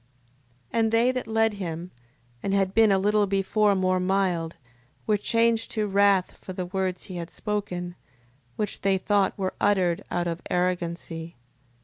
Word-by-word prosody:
6:29. - - +1
And 225 -1 +2
they 230 +3 +4
that 255 -3 -4
led 225 0 +2
him, 175 -3 -5 0.5
and 195 - 0
had 195 -1 +1
been 220 -1 +5
a 195 - +4
little 205 +1 +2
before 200 +1 +2
more 185 -1 +1
mild, 180 -3 0 0.5
were 215 - +3
changed 230 +2 +1
to 215 -1 0
wrath 200 -2 +2
for 185 - -7
the 185 0 -3
words 185 0 -2
he 185 -3 -7
had 170 0 -5
spoken, 180 -4 -4 0.6
which 210 - -3
they 195 -1 +2
thought 195 0 +1
were 190 -2 -2
uttered 190 -2 +2
out 175 0 -1
of 170 0 -3
arrogancy. 170 -2 -2
195 Hz, 160 wpm, -26 LUFS, 180-210 Hz, 0.6 s, been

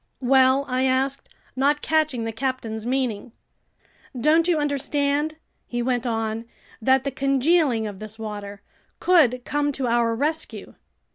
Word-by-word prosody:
"Well?" 265 +1 +4
I 255 +1 0
asked, 265 +1 0 0.3
not 285 +3 +1
catching 310 -6 +1
the 225 - -3
captain's 230 -2 -3
meaning. 245 -4 -2 0.9
"Don't 315 +5 +3
you 345 -3 +3
understand," 290 +1 0 0.3
he 240 0 -2
went 245 0 -1
on, 225 0 -2 0.4
"that 265 +3 +3
the 275 - -2
congealing 275 -2 +2
of 205 -3 -6
this 215 0 -8
water 205 -2 -7 0.4
could 260 -9 +3
come 290 0 0
to 270 -1 -3
our 235 -1 +2
rescue? 310 +6 -3
260 Hz, 135 wpm, -23 LUFS, 230-285 Hz, 0.9 s, Well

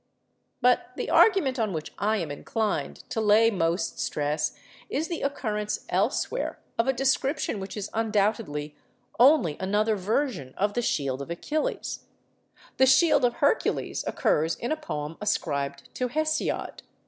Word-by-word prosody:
But 250 0 +2
the - - -3
argument 325 - +4
on 215 -4 0
which 155 -1 -5
I 215 +3 +1
am 165 -7 -3
inclined 215 +8 -3
to 225 - -1
lay 220 +2 +5
most 165 -3 -1
stress 150 +1 -1 0.3
is 315 +3 -2
the 335 - -3
occurrence 210 -7 -2
elsewhere - - 0 0.2
of 230 - +2
a - - +5
description 270 -1 0
which 195 +2 -6
is 205 -1 -5
undoubtedly 205 -9 0 0.4
only 250 - +5
another 210 +3 +1
version 200 - -2
of 205 +1 +1
the 240 - 0
'Shield 140 - -1
of 140 - -7
Achilles.' 295 - -3 0.7
The 265 - +5
'Shield 265 +3 +5
of 240 -1 +3
Hercules' 285 +9 0
occurs 160 +2 +1
in 235 - -4
a - - +2
poem 150 - -5
ascribed 140 -9 -2
to 250 - -1
Hesiod. 310 +4 -1
215 Hz, 145 wpm, -27 LUFS, 165-265 Hz, 0.7 s, lay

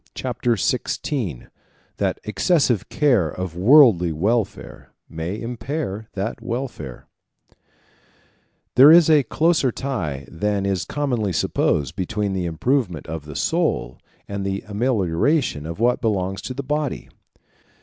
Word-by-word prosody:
Chapter 120 - -1
XVI: 90 - -2 0.5
That - - -1
Excessive 115 - +1
Care 125 - +2
Of 90 +1 -5
Worldly 100 - +6
Welfare 100 +7 -2
May 85 +6 -5
Impair 115 -2 -4
That 100 +3 -4
Welfare 115 - -5 1.7
There 140 +4 +8
is 165 -1 +7
a 150 -2 +6
closer 155 +1 +1
tie 90 - -4
than 100 +3 -2
is 95 -3 -1
commonly 125 -9 -1
supposed 70 -3 0
between 100 +1 -2
the 95 -2 -2
improvement 90 - -1
of 80 -2 -6
the 75 -1 -9
soul - - -1 0.3
and 100 -1 -4
the 95 0 -3
amelioration 105 - 0
of 85 +4 -7
what 120 +2 +2
belongs 95 -3 -1
to 130 - -6
the 140 - -4
body. 150 0 -2
105 Hz, 120 wpm, -22 LUFS, 90-130 Hz, 1.7 s, There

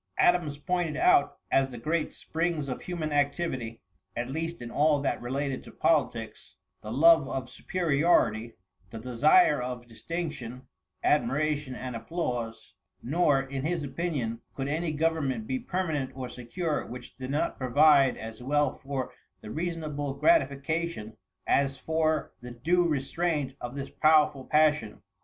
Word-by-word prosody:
Adams 170 -5 +3
pointed 175 +1 -1
out 360 +1 +4
as 135 0 +3
the 125 - -8
great 155 +7 -1
springs 165 -3 -2
of 125 - -4
human 165 -4 -4
activity, 140 -5 -1 0.3
at 120 +2 -3
least 165 +3 -3
in 120 -1 -7
all 150 +1 +3
that 140 - -1
related 135 +2 -2
to - - -12
politics, 130 -8 -1 0.3
the 110 - -7
love 160 +2 +6
of 130 -1 -4
superiority, 150 -10 +1 0.4
the 115 - -8
desire 135 - +4
of 125 -1 -5
distinction, 130 -2 -5 0.4
admiration 145 +1 +1
and 125 -1 -5
applause; 115 -3 -4 0.3
nor, 145 0 +3
in 135 0 -5
his 165 0 -1
opinion 135 -6 -3
could 135 0 -3
any 160 +3 -1
government 160 +3 0
be 260 +3 -2
permanent 175 - -2
or 130 -1 -5
secure 145 +7 -3
which 120 0 -10
did 130 0 -6
not 145 +3 -1
provide 140 +1 +5
as 110 +1 -8
well 145 +2 +2
for 135 -2 -5 0.3
the 105 - -8
reasonable 155 -4 -3
gratification, 155 - +1 0.3
as 135 0 +2
for 160 -1 0
the 125 - -8
due 170 +9 +1
restraint 150 -1 -1
of 120 +2 -6
this 140 -1 -5
powerful 155 -3 +3
passion. 150 -8 +2
145 Hz, 140 wpm, -28 LUFS, 125-160 Hz, 0.4 s, love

